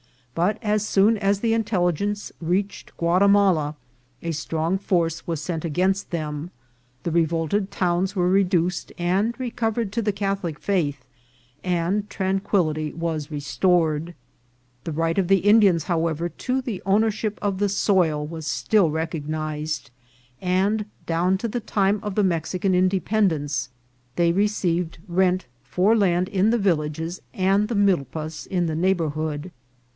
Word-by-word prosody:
But, 180 Hz, +6 st, +1 dB
as 210 Hz, -1 st, +1 dB
soon 210 Hz, +3 st, +4 dB
as 200 Hz, -1 st, +1 dB
the 230 Hz, -1 st, +2 dB
in 225 Hz, 0 st, +2 dB
telligence 200 Hz, +1 st, -1 dB
reached 190 Hz, +5 st, -2 dB
Guatimala, 180 Hz, -3 st, +3 dB, 0.5 s
a 170 Hz, -, -2 dB
strong 160 Hz, +3 st, -1 dB
force 165 Hz, -4 st, 0 dB
was 165 Hz, -3 st, -2 dB
sent 160 Hz, 0 st, -3 dB
against 185 Hz, +5 st, 0 dB
them, 155 Hz, -1 st, -4 dB, 0.5 s
the 170 Hz, -, -2 dB
revolted 165 Hz, +4 st, +1 dB
towns 180 Hz, +2 st, 0 dB
were 180 Hz, -1 st, +2 dB
reduced 180 Hz, -2 st, +1 dB
and 195 Hz, +7 st, 0 dB
re 250 Hz, -2 st, -3 dB
covered 225 Hz, -3 st, -1 dB
to 230 Hz, +3 st, -1 dB
the 210 Hz, -2 st, 0 dB
Catholic 195 Hz, -5 st, -2 dB
faith, 145 Hz, -10 st, -1 dB, 0.6 s
and 180 Hz, +3 st, 0 dB
tranquillity 185 Hz, -5 st, 0 dB
was 160 Hz, -3 st, -3 dB
re 150 Hz, -2 st, -4 dB
stored. 160 Hz, +3 st, +1 dB, 0.7 s
The 165 Hz, -, -3 dB
right 165 Hz, +3 st, 0 dB
of 185 Hz, -, +1 dB
the 195 Hz, +1 st, +4 dB
Indians, 200 Hz, -4 st, +5 dB
however, 165 Hz, 0 st, -1 dB
to 255 Hz, +8 st, -2 dB
the 235 Hz, -8 st, -5 dB
own 195 Hz, +3 st, +3 dB
ership 215 Hz, -1 st, -2 dB
of 200 Hz, -2 st, -1 dB
the 205 Hz, 0 st, +2 dB
soil 175 Hz, -7 st, +2 dB
was 160 Hz, 0 st, -7 dB
still 200 Hz, +1 st, +2 dB
recognised, 155 Hz, -2 st, -3 dB, 0.5 s
and 195 Hz, +4 st, +1 dB, 0.2 s
down 175 Hz, +3 st, +1 dB
to 230 Hz, -, -2 dB
the 240 Hz, +2 st, -2 dB
time 205 Hz, -2 st, +1 dB
of 205 Hz, -2 st, -4 dB
the 210 Hz, -, +3 dB
Mexican 185 Hz, +2 st, 0 dB
Independence 185 Hz, -6 st, +1 dB, 0.5 s
they 170 Hz, -1 st, +3 dB
received 180 Hz, -4 st, 0 dB
rent 185 Hz, +1 st, +1 dB, 0.2 s
for 180 Hz, -, +2 dB
land 185 Hz, -4 st, +2 dB
in 200 Hz, +1 st, +2 dB
the 235 Hz, -, +3 dB
villages 165 Hz, -3 st, -1 dB
and 195 Hz, +2 st, +2 dB
the 235 Hz, -, -2 dB
milpas 160 Hz, -5 st, 0 dB
in 180 Hz, -3 st, 0 dB
the 160 Hz, -2 st, -2 dB
neigh 185 Hz, +4 st, +2 dB
bourhood. 155 Hz, 0 st, -3 dB
180 Hz, 145 wpm, -23 LUFS, 165-200 Hz, 0.7 s, Indians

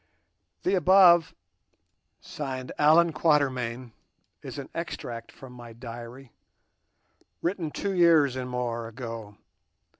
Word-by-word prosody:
The 185 Hz, -, +1 dB
above, 180 Hz, -3 st, +5 dB, 0.9 s
signed 130 Hz, -3 st, -6 dB
"Allan 160 Hz, +3 st, +5 dB
Quatermain", 130 Hz, -6 st, 0 dB, 0.5 s
is -, -, -8 dB
an -, -, -6 dB
extract 115 Hz, -1 st, -6 dB
from 130 Hz, -2 st, -13 dB
my 120 Hz, -2 st, -11 dB
diary 120 Hz, +2 st, -10 dB, 1.1 s
written 175 Hz, -2 st, -2 dB
two 200 Hz, +6 st, -3 dB
years 165 Hz, -7 st, +4 dB
and 130 Hz, -1 st, -4 dB
more 120 Hz, -2 st, -3 dB
ago. 115 Hz, -3 st, -8 dB
130 Hz, 100 wpm, -27 LUFS, 120-165 Hz, 1.1 s, above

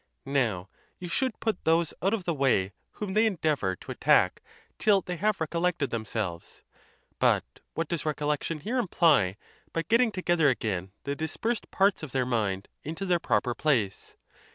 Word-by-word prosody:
Now, 115 Hz, -10 st, 0 dB, 0.3 s
you 180 Hz, -, -7 dB
should 250 Hz, +7 st, -1 dB
put 220 Hz, -5 st, -2 dB
those 165 Hz, 0 st, +2 dB
out 195 Hz, -, +2 dB
of 220 Hz, -4 st, -1 dB
the 170 Hz, -, 0 dB
way 130 Hz, -10 st, +2 dB, 0.2 s
whom 205 Hz, -3 st, -4 dB
they 220 Hz, +2 st, +4 dB
endeavor 155 Hz, -, 0 dB
to -, -, -10 dB
attack -, -, +3 dB, 0.4 s
till 205 Hz, -3 st, +4 dB
they 180 Hz, 0 st, -5 dB
have 210 Hz, +3 st, +1 dB
recollected 165 Hz, -3 st, 0 dB
themselves; 110 Hz, -6 st, -4 dB, 0.6 s
but -, -, +3 dB, 0.3 s
what 165 Hz, -1 st, -1 dB
does 170 Hz, -1 st, -2 dB
recollection 150 Hz, +1 st, -1 dB
here 240 Hz, -, -1 dB
imply 155 Hz, -, +3 dB, 0.4 s
but 165 Hz, -1 st, -2 dB
getting 230 Hz, 0 st, +4 dB
together 175 Hz, -6 st, +2 dB
again 95 Hz, -7 st, -2 dB
the 140 Hz, -, -2 dB
dis 160 Hz, +1 st, -4 dB
persed 230 Hz, 0 st, -2 dB
parts 195 Hz, 0 st, +2 dB
of 155 Hz, -5 st, -7 dB
their 130 Hz, -1 st, +1 dB
mind 105 Hz, -6 st, -1 dB, 0.2 s
into 165 Hz, +6 st, -4 dB
their 180 Hz, -2 st, +2 dB
proper 125 Hz, -6 st, +1 dB
place? 115 Hz, -7 st, 0 dB
160 Hz, 165 wpm, -28 LUFS, 120-185 Hz, 0.6 s, they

